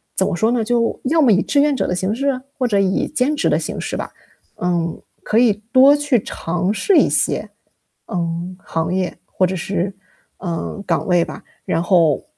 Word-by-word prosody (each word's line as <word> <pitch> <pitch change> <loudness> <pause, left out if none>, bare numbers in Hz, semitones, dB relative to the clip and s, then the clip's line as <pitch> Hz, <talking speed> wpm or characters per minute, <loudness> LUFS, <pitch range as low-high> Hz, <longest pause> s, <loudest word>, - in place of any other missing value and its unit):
怎 190 - +1
么 - - -1
说 220 +6 +1
呢， 240 -2 +1
就， 230 0 0
要 315 +5 +2
么 260 -6 +5
以 195 -1 +4
志 285 - +1
愿 290 -1 +2
者 - - -1
的 180 - -1
形 190 +3 -1
式？ 275 +2 -1 0.2
或 255 -3 +1
者 205 -4 +2
以 190 -1 +1
兼 295 +1 0
职 285 - 0
的 - - +2
形 - - -5
式 - - -4
吧。 - - -5 0.5
嗯， 170 -2 -1 0.2
可 215 - 0
以 215 -4 +3
多 270 +3 +7
去 290 -6 +1
尝 175 +3 -2
试 280 - +2
一 - - +5
些， - - 0 0.6
嗯， 170 +1 -3
行 165 +1 -2
业， 185 -1 -2
或 185 - +1
者 185 - -2
是， 185 +2 -2 0.5
嗯， 175 +3 -4
岗 - - 0
位 175 -2 +3
吧。 - - -8 0.2
然 165 - 0
后， 170 -5 +3
195 Hz, 215 characters per minute, -19 LUFS, 175-250 Hz, 0.6 s, 多